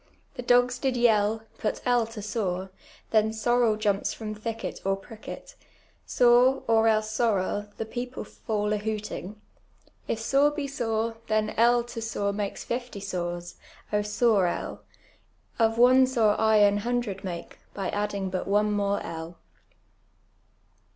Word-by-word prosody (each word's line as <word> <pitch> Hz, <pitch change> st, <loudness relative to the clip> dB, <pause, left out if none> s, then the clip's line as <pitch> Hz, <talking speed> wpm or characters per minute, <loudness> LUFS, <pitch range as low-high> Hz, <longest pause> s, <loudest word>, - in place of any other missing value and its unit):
The -, -, -6 dB
di'L's 245 Hz, 0 st, +3 dB
did 260 Hz, -2 st, 0 dB
yell; 220 Hz, -2 st, +3 dB, 0.2 s
put 215 Hz, -, -1 dB
L 245 Hz, -2 st, +3 dB
to 225 Hz, -2 st, -8 dB
sore, 190 Hz, -3 st, -2 dB, 0.4 s
then 220 Hz, 0 st, +3 dB
sorel 230 Hz, 0 st, +2 dB
jumps 205 Hz, -2 st, 0 dB
from 215 Hz, -1 st, -5 dB
thicket 225 Hz, +1 st, -5 dB
Or 195 Hz, 0 st, +1 dB
pricket, 220 Hz, -, -10 dB, 0.5 s
sore, 245 Hz, +2 st, +4 dB
or 225 Hz, 0 st, +4 dB
else 215 Hz, -1 st, +2 dB
sorel; 210 Hz, -2 st, 0 dB
the 225 Hz, -, -3 dB
people 245 Hz, +3 st, -5 dB
fall 210 Hz, -2 st, -2 dB
a -, -, +1 dB
hooting. 210 Hz, -1 st, -5 dB, 0.7 s
If -, -, -1 dB
sore 275 Hz, +5 st, +3 dB
be 295 Hz, -1 st, -4 dB
.sore, 225 Hz, -4 st, -2 dB
llien 215 Hz, 0 st, +1 dB
L 240 Hz, +1 st, +4 dB
to 240 Hz, -1 st, -7 dB
sore 205 Hz, -3 st, -2 dB
makes 200 Hz, -1 st, -4 dB
fifty 240 Hz, -3 st, -4 dB
sores, 175 Hz, -3 st, -4 dB, 0.2 s
() 210 Hz, 0 st, -2 dB
.sore 210 Hz, -2 st, +2 dB
L! -, -, -4 dB, 0.8 s
Of 225 Hz, 0 st, +3 dB
one 255 Hz, +2 st, +6 dB
sore 225 Hz, -5 st, +3 dB
I 220 Hz, -1 st, +4 dB
aii 205 Hz, 0 st, +4 dB
hundred 240 Hz, -2 st, -2 dB
make, 175 Hz, -3 st, -6 dB, 0.2 s
by 195 Hz, -2 st, -2 dB
adding 205 Hz, -2 st, -2 dB
but 185 Hz, -, -3 dB
one 210 Hz, +1 st, +2 dB
more 200 Hz, -1 st, 0 dB
L." 165 Hz, +1 st, -7 dB
220 Hz, 145 wpm, -27 LUFS, 205-240 Hz, 0.8 s, one